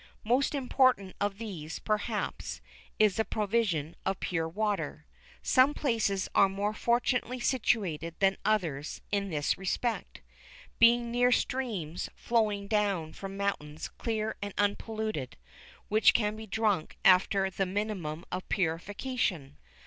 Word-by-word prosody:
Most 255 +6 +2
important 255 -7 +2
of 205 -1 0
these, 180 -9 -6
perhaps, 215 0 -2 0.4
is 210 -3 +4
the 220 - +3
provision 200 -9 0
of 190 0 -1
pure 165 -2 -1
water. 210 +3 -2 0.4
Some 265 +3 +4
places 220 -8 0
are 195 - +5
more 200 +2 -1
fortunately 245 +2 0
situated 190 - 0
than 195 -1 +3
others 170 -9 -1
in 200 -1 0
this 150 -1 0
respect, 225 +5 -2 0.6
being 235 0 +5
near 245 +1 +3
streams 220 -12 -1
flowing 215 -4 0
down 200 -7 0
from 195 0 -7
mountains 160 -6 -3
clear 220 -1 -2
and 200 -1 -5
unpolluted, 205 - -1 0.5
which 215 +1 +5
can 210 -2 +1
be 220 0 -8
drunk 205 -6 0
after 190 +1 +5
the 190 +1 -1
minimum 185 -5 -3
of 185 +1 -4
purification. 185 - -1
205 Hz, 125 wpm, -30 LUFS, 185-225 Hz, 0.6 s, are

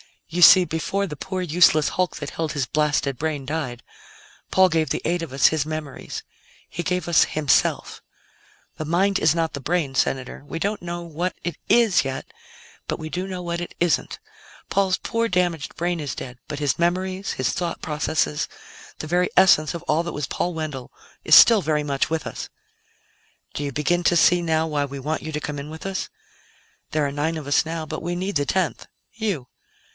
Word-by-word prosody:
You 175 +2 -2
see, 180 +2 +9
before 180 +4 -2
the 150 -4 -7
poor, 185 +4 -4
useless 165 -3 +4
hulk 185 -1 -1
that 145 -2 -6
held 160 -2 -3
his 145 -3 -1
blasted 145 -1 0
brain 150 -3 -2
died, 130 -5 -4 0.7
Paul 190 0 +5
gave 160 -2 +1
the - - -1
eight 175 +1 0
of 160 -6 -6
us 135 - +5
his 155 -3 0
memories; 155 -3 -6 0.5
he 175 - -4
gave 180 0 -1
us 170 - +5
himself. 150 -3 +1 0.8
The 155 - -4
mind 190 +5 +2
is 155 +1 +3
not 165 -1 0
the 140 - -4
brain, 150 -1 -1
Senator; 130 0 -1
we 165 - -5
don't 205 +5 -2
know 175 0 -5
what 170 +2 -3
it 175 -3 -4
is 230 -6 +4
yet, 135 0 -4 0.6
but - - -2
we 155 - -6
do 180 +3 -3
know 185 -2 -5
what 170 0 -3
it 175 - -7
isn't. 175 -3 +1 0.5
Paul's 190 -1 +2
poor, 230 0 -1
damaged 175 -6 -1
brain 175 0 -1
is 145 -5 -4
dead, 125 -1 -8
but 145 - -5
his 145 0 0
memories, 185 +3 0
his 130 - -1
thought 175 -2 -3
processes, 150 - -1 0.5
the 155 - -5
very 180 +2 +2
essence 180 -5 +5
of 170 - -6
all 160 -1 +1
that 170 0 -5
was 145 -2 -3
Paul 175 +4 -2
Wendell 150 -6 -5 0.3
is 155 - +7
still 225 -3 +8
very 150 -2 0
much 140 -2 -1
with 160 0 -2
us. - - -6 1.0
"Do 145 - -4
you 140 -1 -3
begin 175 +6 +1
to 175 - +4
see 175 +1 +5
now 160 -1 +1
why 150 -3 -1
we 140 0 -7
want 150 +4 -3
you 155 - -5
to 150 - -2
come 145 -1 -4
in 140 +2 -7
with 160 +3 -9
us? 195 -1 -3 0.8
There 155 -1 +1
are 140 - -1
nine 155 +3 -1
of 155 - -7
us 145 - +3
now, 160 0 -4
but - - -5
we 175 0 -3
need 185 0 -1
the 145 - 0
tenth 185 +2 -1 0.3
you. 205 - -3
160 Hz, 200 wpm, -23 LUFS, 150-180 Hz, 1.0 s, see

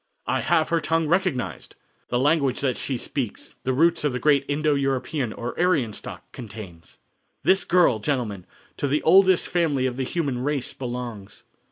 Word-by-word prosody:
"I - - 0
have 155 - +2
her 170 - +2
tongue 165 +1 0
recognized! 175 -6 -1 0.3
The 120 - 0
language 140 -1 +2
that 130 -3 +1
she 135 - -3
speaks, 120 -2 -5
the 130 - 0
roots 165 +5 +3
of 145 -3 +1
the 125 - -2
great 145 -1 +3
Indo 150 +1 +1
European, 135 -2 -1
or 120 +2 -5
Aryan 150 -11 +2
stock, - - -8
contains." 100 -8 -10 0.5
"This 190 0 +4
girl, 170 -10 +4
gentlemen, 105 -7 -2 0.3
to 145 - -1
the 145 +2 0
oldest 185 +1 +5
family 155 -7 +1
of 125 -1 -2
the 135 - -1
human 140 -2 -2
race 140 0 -2
belongs. 120 -5 -6
140 Hz, 170 wpm, -24 LUFS, 125-160 Hz, 0.5 s, oldest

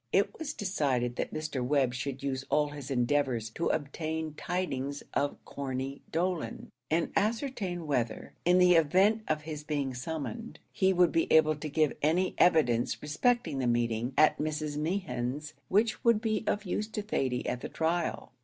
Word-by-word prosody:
It 195 +1 +2
was 305 -2 -3
decided 135 -11 0
that - - -2
Mr. 155 -4 -3
Webb 130 -1 +2
should 135 +1 -4
use 135 -1 -2
all 150 -1 +2
his 145 -2 -8
endeavours 125 -3 +1
to 165 - -2
obtain 155 +1 -2
tidings 145 -5 -3
of 145 0 0
Corney 135 0 -4
Dolan, 170 -7 -2 0.2
and 165 +2 +1
ascertain 210 - -1
whether, 120 -6 -2
in 175 +1 +4
the 180 -1 +6
event 185 +7 +4
of 155 -1 -1
his 150 -1 -6
being 145 -3 -2
summoned, 160 - -5 0.2
he 190 -1 +3
would 180 -2 +4
be 165 - +1
able 155 -1 +5
to 150 +1 -6
give 155 0 +2
any 175 +5 +2
evidence 125 -9 +3
respecting 155 - 0
the 130 - 0
meeting 120 +1 0
at 155 - +5
Mrs. 150 -1 -2
Mehan's, 150 -4 -2 0.2
which 220 +4 +2
would 235 -2 +5
be 220 -1 -1
of 210 +1 0
use 210 +3 -2
to 220 -1 -4
Thady 130 -11 -1
at 125 - -2
the - - -5
trial. 165 +1 -1
155 Hz, 165 wpm, -30 LUFS, 135-180 Hz, 0.2 s, the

